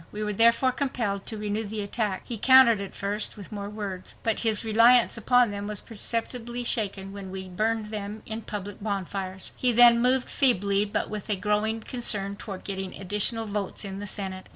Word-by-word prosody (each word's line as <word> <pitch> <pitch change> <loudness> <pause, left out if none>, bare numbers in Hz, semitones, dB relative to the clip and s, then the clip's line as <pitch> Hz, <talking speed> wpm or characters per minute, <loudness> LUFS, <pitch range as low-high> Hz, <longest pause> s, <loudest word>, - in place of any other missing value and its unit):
We 210 0 -5
were 210 0 -2
therefore 230 +4 +4
compelled 235 -7 -3
to 220 - -2
renew 210 +1 -2
the 210 0 -4
attack. 200 -1 -3
He 235 -4 -3
countered 260 -4 +6
at 200 - -7
first 205 +2 -3
with 200 0 -11
more 200 -1 -6
words. 200 -3 -7
But 225 -1 0
his 225 -1 +2
reliance 230 +3 +5
upon 245 0 +3
them 200 0 -5
was 210 -2 -3
perceptibly 235 +2 -4
shaken 195 -5 -1
when 200 -1 -8
we 190 0 -6
burned 215 +3 -2
them 210 0 -6
in 220 +1 -2
public 205 -2 -7
bonfires. 195 -2 -4
He 250 - +3
then 235 0 +8
moved 255 +1 +3
feebly 205 -6 +3
but 205 - -3
with 210 0 -6
a 210 - +4
growing 210 +3 -1
concern 210 -5 -1
toward 200 -2 -8
getting 190 -1 -4
additional 210 +4 +1
votes 205 -1 -4
in 195 0 -5
the 205 - -5
Senate. 190 -2 -4
210 Hz, 190 wpm, -26 LUFS, 200-230 Hz, -, then